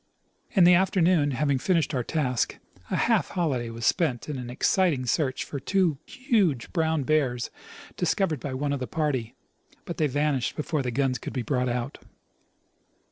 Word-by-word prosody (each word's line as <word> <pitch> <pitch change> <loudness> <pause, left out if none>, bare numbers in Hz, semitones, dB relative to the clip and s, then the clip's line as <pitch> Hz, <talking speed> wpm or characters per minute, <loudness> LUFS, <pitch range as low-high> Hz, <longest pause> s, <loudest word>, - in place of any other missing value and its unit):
In 190 - +5
the 175 +1 +7
afternoon, 180 -4 +3
having 140 0 0
fin 180 +6 +2
ished 155 -1 0
our 125 -3 0
task, 125 -5 -1 0.3
a - - -1
half 225 -9 +2
holiday 135 -10 -1
was 115 0 -5
spent 155 -10 +1
in 145 -3 -4
an 120 -1 -6
exciting 145 +1 +1
search 130 +2 0
for 140 - -6
two 170 -1 +1
huge 215 - 0
brown 160 -4 +1
bears 130 -5 0 0.5
discovered 175 -3 0
by 130 +1 -5
one 140 +2 -1
of 140 - -2
the 125 - -4
party, 140 -8 -2 0.5
but 170 - -6
they 155 - +2
vanished 145 -2 0
before 150 0 -1
the 125 - -2
guns 130 +1 0
could - - -7
be 125 - -2
brought 125 +1 0
out. 120 0 -3
145 Hz, 175 wpm, -26 LUFS, 125-170 Hz, 0.5 s, the